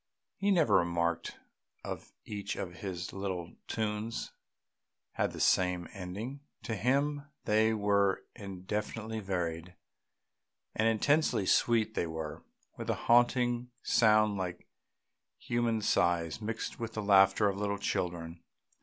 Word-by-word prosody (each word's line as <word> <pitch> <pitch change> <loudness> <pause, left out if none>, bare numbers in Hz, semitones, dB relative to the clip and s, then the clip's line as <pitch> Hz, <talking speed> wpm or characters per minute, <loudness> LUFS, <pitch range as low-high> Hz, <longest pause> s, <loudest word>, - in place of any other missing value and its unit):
He 200 +1 +1
never 175 -6 +5
remarked 85 -1 0 0.5
that - - -5 0.2
each 100 -1 -4
of 90 -1 -5
his 90 -2 -5
little 95 -3 -4
tunes 110 +1 -2 0.8
had - - 0
the - - -8
same 90 -1 +2
ending; 100 +9 -6 0.2
to 110 - -2
him 140 +7 +1 0.2
they 110 +1 +3
were 100 -2 +2
infinitely 105 +2 -4
varied. 90 -3 -3 1.0
And 110 - +2
intensely 130 0 +2
sweet 110 +2 +3
they 85 - -1
were, 80 -2 -5 0.4
with - - -5
a - - +2
haunting 120 0 +3
sound 110 -2 +4
like 90 -2 -4 0.7
human 120 -2 0
sighs 85 -2 +1
mixed 110 +1 -4
with 115 -1 -4
the 110 - -3
laughter 100 +1 +5
of 100 -1 -1
little 100 0 -1
children. 85 -3 -3
105 Hz, 120 wpm, -31 LUFS, 90-115 Hz, 1.0 s, never